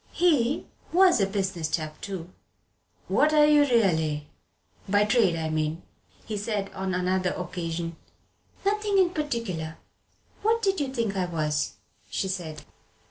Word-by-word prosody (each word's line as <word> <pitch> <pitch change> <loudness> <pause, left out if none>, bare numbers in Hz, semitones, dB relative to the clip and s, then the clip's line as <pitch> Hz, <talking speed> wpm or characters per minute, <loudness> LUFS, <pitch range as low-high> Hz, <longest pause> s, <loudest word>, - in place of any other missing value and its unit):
He 295 -7 +2 0.3
was 360 - +5
a 195 - +3
"business 190 -5 -2
chap" 155 -1 -3
too. 185 -3 -6 0.8
"What 305 +1 +3
are 300 -1 +7
you 300 0 +6
really 160 - +2 0.6
by 205 +1 +4
trade, 210 -5 +3
I 160 -1 -2
mean?" 155 +2 -1 0.4
he 215 - -3
said 205 -1 -2
on 190 -1 -2
another 185 0 +1
occasion. 170 -2 -4 0.7
"Nothing 415 0 +1
in 370 -2 +4
particular. 230 - -3 0.6
What 455 +2 +2
did 390 -3 +2
you 275 -2 -1
think 230 -6 -1
I 185 -1 +1
was?" 150 -4 -1 0.4
she 190 - -1
said. 175 -5 -4
195 Hz, 135 wpm, -27 LUFS, -, 0.8 s, are